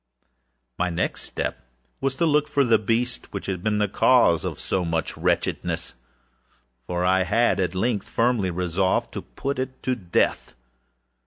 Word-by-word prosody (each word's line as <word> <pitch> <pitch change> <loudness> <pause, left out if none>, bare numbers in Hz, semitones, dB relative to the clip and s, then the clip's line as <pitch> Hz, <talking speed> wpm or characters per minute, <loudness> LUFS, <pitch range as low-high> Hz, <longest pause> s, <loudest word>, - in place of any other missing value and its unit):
â 60 0 -46
My 90 0 +1
next 90 +1 -2
step 65 - -4 0.4
was 135 0 -1
to 170 - +1
look 150 -1 +3
for 145 -1 +2
the 115 -4 +4
beast 115 +4 -1
which 100 - -5
had 95 -2 -3
been 105 +1 0
the 105 0 +2
cause - - +4
of - - -4
so 95 - -1
much 80 -2 -2
wretchedness; - - -1 0.9
for 90 +7 -2
I 95 +1 +3
had, 115 +5 +2
at 90 -1 -1
length, 105 +1 -1
firmly 115 -5 +1
resolved 90 +1 0
to - - -4
put 140 0 -4
it 130 0 -5
to 130 - +1
death. 90 - 0
95 Hz, 165 wpm, -24 LUFS, 85-120 Hz, 0.9 s, the